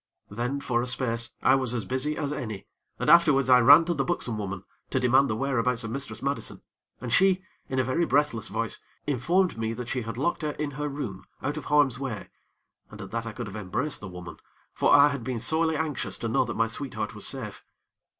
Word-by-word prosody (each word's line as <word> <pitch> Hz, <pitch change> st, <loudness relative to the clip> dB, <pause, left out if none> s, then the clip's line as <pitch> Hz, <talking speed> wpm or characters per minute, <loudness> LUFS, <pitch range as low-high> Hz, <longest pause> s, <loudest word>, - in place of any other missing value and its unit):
Then, 120 Hz, +6 st, -2 dB
for 120 Hz, -3 st, 0 dB
a 125 Hz, -, -2 dB
space, 120 Hz, -2 st, 0 dB
I 130 Hz, -, +6 dB
was 130 Hz, -3 st, +2 dB
as 115 Hz, -4 st, -2 dB
busy 130 Hz, +6 st, -1 dB
as 145 Hz, -1 st, -2 dB
any, 110 Hz, -8 st, -5 dB, 0.3 s
and -, -, -3 dB
afterwards 145 Hz, -6 st, +5 dB
I 125 Hz, -, +8 dB
ran 145 Hz, +7 st, +8 dB
to 175 Hz, -, 0 dB
the 140 Hz, -4 st, 0 dB
buxom 130 Hz, -6 st, -2 dB
woman 100 Hz, -2 st, -4 dB, 0.3 s
to 130 Hz, -, 0 dB
demand 130 Hz, +2 st, +4 dB
the 110 Hz, -, 0 dB
whereabouts 125 Hz, -1 st, 0 dB
of 115 Hz, -, -5 dB
Mistress 125 Hz, -3 st, -4 dB
Madison, 140 Hz, +1 st, -3 dB, 0.4 s
and 120 Hz, -2 st, -4 dB
she, 190 Hz, +2 st, +4 dB, 0.3 s
in 130 Hz, -, -2 dB
a 130 Hz, -, +3 dB
very 130 Hz, +7 st, 0 dB
breathless 145 Hz, -8 st, +1 dB
voice, 115 Hz, -1 st, -3 dB, 0.3 s
informed 150 Hz, +3 st, +1 dB
me 115 Hz, 0 st, -1 dB
that 120 Hz, +1 st, -6 dB
she 130 Hz, -, -1 dB
had 115 Hz, 0 st, -6 dB
locked 170 Hz, +7 st, 0 dB
her 150 Hz, -1 st, -2 dB
in 150 Hz, -1 st, -3 dB
her 150 Hz, +2 st, -3 dB
room 125 Hz, -10 st, -6 dB, 0.2 s
out 145 Hz, +2 st, -1 dB
of 155 Hz, -, -6 dB
harm's 145 Hz, -4 st, +3 dB
way, 130 Hz, -7 st, -5 dB, 0.6 s
and -, -, -12 dB
at -, -, -8 dB
that 115 Hz, 0 st, -3 dB
I -, -, -4 dB
could 120 Hz, +2 st, -6 dB
have 100 Hz, -1 st, -8 dB
embraced 115 Hz, +9 st, -2 dB
the 105 Hz, -, -6 dB
woman; 90 Hz, -1 st, -9 dB, 0.4 s
for -, -, +2 dB
I 145 Hz, 0 st, +8 dB
had 140 Hz, -4 st, -4 dB
been 125 Hz, -1 st, -3 dB
sorely 160 Hz, +7 st, +1 dB
anxious 155 Hz, -3 st, -3 dB
to 115 Hz, -, -3 dB
know 110 Hz, -, +2 dB
that -, -, -5 dB
my 115 Hz, -, +3 dB
sweetheart 115 Hz, -2 st, -4 dB
was 105 Hz, -, -5 dB
safe. 120 Hz, -7 st, -5 dB
130 Hz, 225 wpm, -27 LUFS, 115-145 Hz, 0.6 s, I